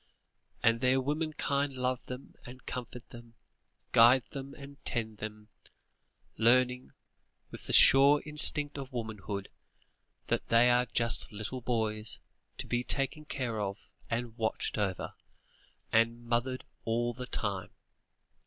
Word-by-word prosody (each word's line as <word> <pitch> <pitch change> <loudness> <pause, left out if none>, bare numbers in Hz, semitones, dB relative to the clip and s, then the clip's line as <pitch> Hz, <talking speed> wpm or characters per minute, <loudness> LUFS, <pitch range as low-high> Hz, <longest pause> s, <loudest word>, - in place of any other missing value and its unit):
And 115 +1 +3
their 130 +1 +3
womenkind 145 -1 -1
love 125 0 -1
them, 125 +2 -8
and 130 +1 -12
comfort 125 -1 -7
them, 120 -1 -13 0.6
guide 120 +2 +6
them 140 0 -7
and 140 0 -12
tend 110 -2 -3
them, 105 0 -8 0.9
learning, 125 +2 +2 0.6
with - - -10
the - - -2
sure 140 +2 +7
instinct 150 -1 +4
of 135 0 -7
womanhood, 105 -4 -5 0.8
that - - -1
they 120 +1 +5
are 125 +1 +2
just 115 -1 0
little 105 +5 -5
boys, 110 -3 -1 0.4
to - - -3
be 120 0 -1
taken 140 +4 0
care 125 -6 -3
of, 100 -1 -3 0.3
and 115 -1 -3
watched 110 -1 -2
over, 95 -3 -2 0.8
and 115 +1 +2
"mothered" 120 +2 -1 0.2
all 120 +1 0
the 125 +1 -7
time. 100 -6 -2
120 Hz, 125 wpm, -31 LUFS, 115-130 Hz, 0.9 s, sure